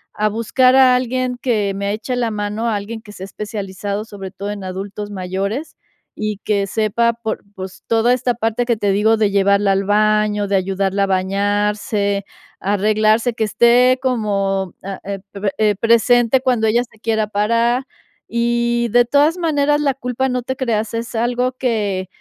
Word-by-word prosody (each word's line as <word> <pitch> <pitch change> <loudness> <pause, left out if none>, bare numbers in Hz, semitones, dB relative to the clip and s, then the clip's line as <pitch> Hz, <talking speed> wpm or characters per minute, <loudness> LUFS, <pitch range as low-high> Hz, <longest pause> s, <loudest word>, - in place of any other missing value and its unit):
a 215 - +1
buscar 255 +4 +2
a 260 -1 +6
alguien 255 0 -1
que 210 -6 0
me 200 +1 -2
eche 225 +4 -3
la 240 -2 0
mano, 210 +2 -3
alguien 220 +2 -4
que 205 -1 -13
sea 190 - -9
especializado, 200 0 -5
sobre 200 -3 -8
todo 200 +2 -6
en 205 -1 -6
adultos 195 +2 -6
mayores, 195 - -4 0.4
y 215 -1 -3
que 200 -2 0
sepa 220 +3 +1
por 225 -1 -5
pues, 190 0 -8
toda 230 +2 +3
esta 250 -1 0
parte 225 +1 -1
que 235 -2 +1
te 205 -1 +1
digo 215 +3 +3
de 210 -2 +2
llevarla 200 0 +3
al 195 0 +1
baño, 210 0 +2
de 200 - 0
ayudarla 195 +1 0
a - - +3
bañarse, 200 +2 0 0.3
arreglarse 215 +4 +2
que 220 - -1
esté 245 +4 +4
como 195 -6 -1
ah, 195 0 -6
eh, 195 0 -4
pe 200 - -9
pe, 200 -1 0
eh, 210 -1 +2
presente 235 +3 +3
cuando 245 -4 +1
ella 235 +3 +2
se 225 -2 -20
quiera 220 -2 0
parar. 230 +5 +1 0.5
Y 235 0 +1
de 245 +1 +5
todas 290 +7 +3
maneras, 295 -3 +1
la 280 -2 +1
culpa 255 0 -2
no 250 -1 -2
te 260 +2 -3
creas, 225 -4 -1
es 230 +1 -4
algo 245 +2 0
que 210 -7 -1
215 Hz, 175 wpm, -19 LUFS, 200-240 Hz, 0.5 s, a